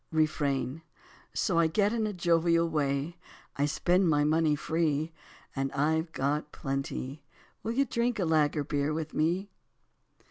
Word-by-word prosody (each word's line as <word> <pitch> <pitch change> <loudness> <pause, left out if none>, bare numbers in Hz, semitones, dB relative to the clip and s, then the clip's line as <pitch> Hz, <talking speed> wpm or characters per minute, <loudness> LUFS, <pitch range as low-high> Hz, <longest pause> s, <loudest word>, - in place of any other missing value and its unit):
Refrain: 150 -2 0 0.5
So 170 -3 +1
I 165 - +5
get 205 +6 +2
in 225 -2 0
a - - -2
jovial 170 -2 +2
way, 150 +1 -1 0.4
I 145 +1 +1
spend 180 +4 +2
my 145 -1 +3
money 155 0 +3
free. 160 0 0 0.4
And 135 0 -1
I've 160 +3 +1
got 150 +2 -1
plenty! 135 0 -4 0.4
Will 225 - -2
you 275 +3 +2
drink 235 0 0
lager 155 -5 +2
beer 145 +1 -1
with 160 -1 -4
me? 180 +6 0
160 Hz, 140 wpm, -29 LUFS, 145-170 Hz, 0.5 s, I